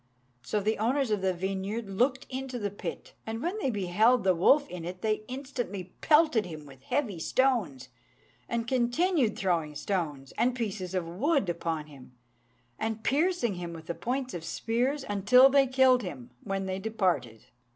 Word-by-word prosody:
So 210 +12 -1
the 215 +2 0
owners 250 +2 +1
of 210 -2 +1
the 190 0 +2
vineyard 195 +4 -3
looked 250 +7 0
into 260 -1 -5
the 205 -4 -3
pit, 205 - -7
and 225 0 -3
when 355 - -2
they 270 - 0
beheld 215 +3 +3
the 190 -1 +4
wolf 280 - +4
in 180 -7 -7
it, 180 +2 -7
they 215 -1 +1
instantly 250 -8 -5
pelted 300 - +4
him 155 -3 -8
with 135 -2 -14
heavy 225 - -1
stones, 185 - 0 0.6
and 235 -1 -2
continued 260 - +1
throwing 165 -5 0
stones 150 -8 -3
and 245 +1 +2
pieces 195 -6 -3
of 180 -3 -1
wood 245 - +1
upon 165 -2 -2
him, 135 -4 -15 0.7
and 220 0 -3
piercing 300 - +1
him 175 -2 -6
with 160 -1 -10
the 170 - -3
points 255 +6 -3
of 170 - -5
spears, 245 - -1
until 225 +7 +6
they 275 -1 +5
killed 260 -1 +4
him, 130 - -7
when 195 -1 -2
they 190 0 -3
departed. 185 - -1
215 Hz, 170 wpm, -29 LUFS, 180-255 Hz, 0.7 s, until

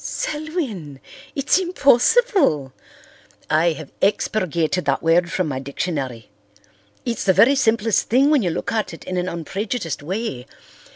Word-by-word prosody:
"Selwyn! 290 - -4 0.4
It's 280 +6 +2
impossible." 345 - +3 0.8
"I 160 +2 +3
have 155 -2 -10
expurgated 180 -4 0
that 140 -1 0
word 170 +1 +3
from 185 - 0
my 135 -3 -3
dictionary. 135 -4 -4 0.7
It's 235 -1 -2
the 190 - +4
very 250 +9 +6
simplest 225 -5 +1
thing 270 +5 +4
when 295 -4 +4
you 180 - 0
look 160 - -3
at 220 -6 -2
it - - -14
in 185 - -5
an 180 +1 -1
unprejudiced 170 - -4
way. 175 - -4
185 Hz, 135 wpm, -21 LUFS, 155-245 Hz, 0.8 s, very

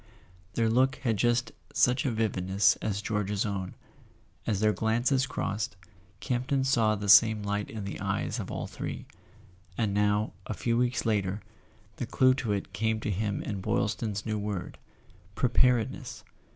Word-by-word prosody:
Their 115 -1 +2
look 130 +4 +3
had 115 -4 +2
just 120 +3 +1 0.2
such 125 +2 +3
a - - +1
vividness 100 -3 +2
as 100 -1 -3
George's 105 -1 -1
own; 95 -3 -3 0.7
as 105 -4 +1
their 105 0 +3
glances 120 +5 +1
crossed, 105 -2 -3 0.4
Campton 130 +2 0
saw 115 -5 +3
the 100 0 -5
same 110 +1 +7
light 100 0 -2
in 110 -2 -6
the 100 - -5
eyes - - -2
of - - -5
all - - -4
three. - - -6 0.7
And 105 -4 0
now, 105 +1 +1
a 110 - -3
few 115 +5 0
weeks 120 0 +1
later, 105 -2 0 0.5
the 125 - -3
clue 130 +2 +4
to 115 -5 -2
it 100 -1 -3
came 110 +3 0
to 105 - -2
him 100 +1 -2
in 100 -3 -4
Boylston's 105 +1 -1
new 110 -2 -1
word. 100 -3 -4 0.6
Preparedness! 125 -1 +1
110 Hz, 155 wpm, -29 LUFS, 100-120 Hz, 0.7 s, same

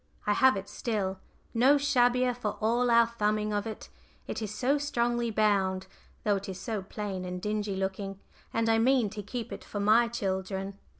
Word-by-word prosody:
I 210 - +3
have 260 -1 +5
it 195 +1 -6
still 195 -5 -2 0.3
no 260 +5 +5
shabbier 250 -3 +3
for 230 -4 -3
all 235 +3 +2
our 235 0 +6
thumbing 215 -2 -1
of 205 +1 -1
it: 220 - -7 0.4
it - - -4
is 210 -2 -3
so 260 +7 +1
strongly 240 -4 0
bound, 195 -3 +1 0.4
though 205 -2 +2
it 195 0 -7
is 190 -1 -6
so 210 +1 -3
plain 195 -1 -5
and 180 0 -4
dingy 210 0 -2
looking, 195 0 -3 0.3
and 225 0 0
I 225 0 +4
mean 240 -3 +3
to 210 - -5
keep 230 +3 -6
it - - -8
for 205 - -5
my 220 +4 +5
children. 195 -2 -3
215 Hz, 185 wpm, -29 LUFS, 195-235 Hz, 0.4 s, our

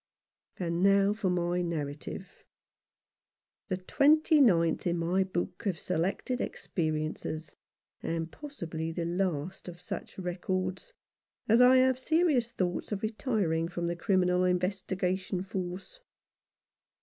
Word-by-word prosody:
And 170 -1 -1
now 200 +1 +5
for 210 -3 -1
my 175 0 0
narrative; 155 +2 -5 1.2
the 185 -3 -1
twenty 300 - +4
ninth 170 -9 +3
in 175 0 +1
my 175 +3 +2
book 185 +2 -3
of 185 -4 0
selected 185 +9 -1
experi 160 -9 -2
ences, 155 0 -6 0.5
and 165 0 -3
possibly 165 - -5
the 165 0 -3
last 175 -1 -2
of 175 -1 -8
such 180 - -7
records, 185 - -3 0.6
as 230 +3 +5
I 255 +1 +8
have 260 0 +4
serious 295 -5 +2
thoughts 180 -5 -2
of 205 0 -3
retiring 210 - 0
from 175 0 -4
the 170 0 -1
Criminal 180 -1 +2
Investigation 185 0 -1
Force. 190 - -5
185 Hz, 120 wpm, -30 LUFS, 170-210 Hz, 1.2 s, I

